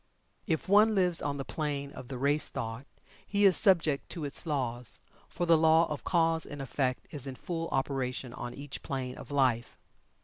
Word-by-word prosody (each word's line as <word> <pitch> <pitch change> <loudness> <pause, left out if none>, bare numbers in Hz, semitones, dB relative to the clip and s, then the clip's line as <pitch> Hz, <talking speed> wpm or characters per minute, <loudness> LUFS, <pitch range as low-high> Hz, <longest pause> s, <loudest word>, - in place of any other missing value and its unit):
If 160 -2 -1
one 210 +3 +5
lives 180 -3 +4
on 145 -1 -2
the 135 - -5
plane 145 -3 -3
of 130 - -10
the 130 -1 -6
race 145 +4 +1
thought, 115 +4 -6 0.4
he 205 0 +1
is 190 -3 +6
subject 160 -7 +4
to 165 -4 -5
its 145 +4 +2
laws, 125 -5 -2 0.3
for 175 - -2
the 165 -2 +5
law 160 +1 +5
of 150 - -4
cause 165 -2 +2
and 145 - -7
effect 130 -1 -2
is 140 -2 -2
in 135 - -6
full 165 +3 -4
operation 130 -2 -2
on 120 0 -7
each 140 0 -7
plane 130 -2 -4
of - - -11
life. 130 -4 0
145 Hz, 190 wpm, -30 LUFS, 130-165 Hz, 0.4 s, is